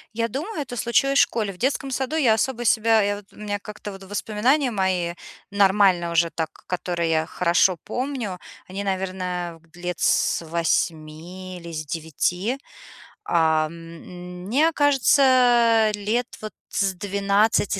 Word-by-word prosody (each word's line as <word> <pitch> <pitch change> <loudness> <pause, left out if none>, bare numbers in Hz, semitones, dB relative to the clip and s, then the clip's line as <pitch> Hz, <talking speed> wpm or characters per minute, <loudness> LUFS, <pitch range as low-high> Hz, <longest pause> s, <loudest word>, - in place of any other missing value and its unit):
Я 230 0 0
думаю, 305 - -4
это 245 -3 -6
случилось 275 +4 +2
в - - +8
школе. 215 -4 -2
В 180 - -14
детском 270 +3 -1
саду 265 +3 -2
я 235 -8 +4
особо 240 +1 -1
себя 225 0 +4
я 205 0 0
вот 205 - -11
у - - -19
меня 205 -1 -3
как-то 210 0 -8
вот 195 0 -11
воспоминания 220 +8 0
мои, 185 -5 -1 0.3
нормальные 190 -3 +3
уже 170 0 +3
так, 160 -1 -3 0.2
которые 175 -2 -2
я 160 -1 +1
хорошо 175 +1 +2
помню, 250 -8 -3 0.3
они, 195 +2 -5
наверное, 185 -3 -3
лет 175 0 -5
с 165 - +2
8 170 +2 -2
или 170 -1 -9
с 155 0 -3
9. 175 - -2 0.7
А, 160 -2 +3
м, 175 +2 -10
мне 295 +10 +3
кажется, 250 -5 +4
лет, 220 +4 -1
вот, 215 0 -7 0.2
с 195 -2 0
12, 200 +2 +1
200 Hz, 145 wpm, -23 LUFS, 175-235 Hz, 0.7 s, в